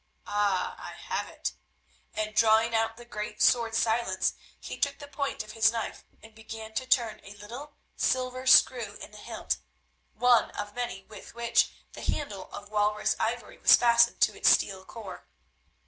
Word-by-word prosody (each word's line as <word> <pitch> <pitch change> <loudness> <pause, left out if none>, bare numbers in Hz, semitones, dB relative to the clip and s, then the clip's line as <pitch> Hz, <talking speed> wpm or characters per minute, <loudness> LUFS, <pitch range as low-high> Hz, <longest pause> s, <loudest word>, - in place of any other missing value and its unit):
Ah! 205 -3 0
I - - -8
have - - -4
it," - - -4 0.6
and, 215 0 -2
drawing 225 +1 +4
out 225 0 0
the 240 - -12
great 210 -2 -6
sword 230 -2 +3
Silence, 225 -4 +1 0.3
he - - -7
took 280 0 0
the 285 - -10
point 280 -4 -3
of 215 - -11
his 220 0 +3
knife 230 -1 -5 0.2
and 220 0 -14
began 220 0 -9
to 255 +4 -3
turn 235 -5 +1
a 200 +1 -12
little 240 +9 -10 0.2
silver 255 0 -1
screw 235 -5 +5
in - - -10
the 210 - -12
hilt, - - -3 0.6
one 245 -1 +4
of 205 0 -5
many 240 -5 -4
with 210 +2 -13
which 235 0 +2 0.2
the - - -9
handle 205 -10 -4
of 205 0 -9
walrus 210 0 +1
ivory 235 +2 -3
was - - +8
fastened 235 0 +4
to - - +3
its - - +4
steel 190 -1 +2
core. 210 -3 -10
225 Hz, 170 wpm, -28 LUFS, 210-240 Hz, 0.6 s, was